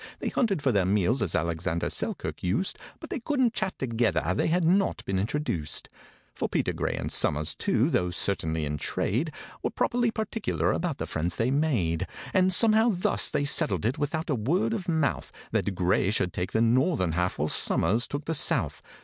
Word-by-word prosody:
They - - -3
hunted 195 - 0
for 135 - +3
their 100 -4 +2
meals, 105 +6 +2
as 85 - 0
ALEXANDER 85 +1 -1
SELKIRK - - -3
used, 100 - -1 0.2
But - - -10
they - - -2
couldn't 255 -2 +1
chat 190 -4 -2
together—they 110 - 0
had 170 +1 +1
not 190 +4 +1
been 95 -1 -1
introduced. 100 - -2 0.4
For - - -3
PETER - - 0
GRAY, - - -2
and - - -4
SOMERS 75 +1 +2
too, - - +1
though 90 - +1
certainly 80 -3 0
in 75 0 -3
trade, 135 - -1 0.3
Were - - -1
properly 240 -1 0
particular 220 -1 -1
about 165 -5 -2
the - - -3
friends 85 +1 -2
they 115 +7 0
made; 125 - 0 0.3
And 185 0 +4
somehow 220 +4 +4
thus 180 -3 +2
they 145 - 0
settled 150 -5 +1
it 130 +7 0
without 155 +2 -2
a - - +3
word 175 - 0
of 195 -5 -4
mouth— 160 -4 0 0.2
That 100 - -1
GRAY 95 +2 +2
should 95 -4 0
take 90 +1 -3
the 110 - +1
northern 120 - +2
half, 90 +2 -1
while 75 - 0
SOMERS 110 +8 +2
took 145 +3 -5
the 165 - -1
south. 155 - +1
125 Hz, 185 wpm, -27 LUFS, -, 0.4 s, And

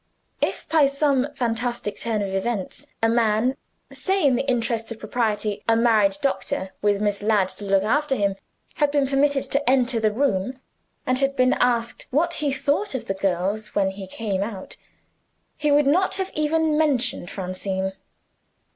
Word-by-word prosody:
If, - - -2
by 310 -3 +4
some 275 -1 +1
fantastic 230 -3 -2
turn 220 -3 -1
of 195 -1 -4
events, 195 0 -3 0.2
a - - +6
man 230 +2 +2 0.4
say 385 -3 0
in 265 -3 +4
the 270 +3 -1
interests 230 -2 -1
of 230 - -5
propriety, 215 -2 -2
a 225 - +5
married 225 -2 +3
doctor, 190 -8 -1
with 205 -1 +2
Miss 205 -1 0
Ladd 205 -3 +2
to 205 - -7
look 195 -1 +2
after 285 +5 +1
him 200 -4 0 0.4
had 295 -3 +3
been 285 -1 +2
permitted 275 0 +2
to 280 -1 +2
enter 250 -2 +2
the 215 -1 +2
room, 255 0 -1 0.5
and 255 0 +1
had 275 0 +1
been 255 -1 +3
asked 235 -1 0
what 335 +6 +1
he 290 -2 +1
thought 285 +6 0
of 260 - -4
the 195 - -1
girls 195 +3 -2
when 195 -1 +2
he 190 0 -8
came 195 -1 -3
out, 200 -2 -5 0.8
he 300 -1 0
would 290 0 +4
not 365 +7 +2 0.2
even 310 +1 +1
have 300 - +1
mentioned 265 - +1
Francine. 190 0 -3
235 Hz, 170 wpm, -23 LUFS, 205-275 Hz, 0.8 s, a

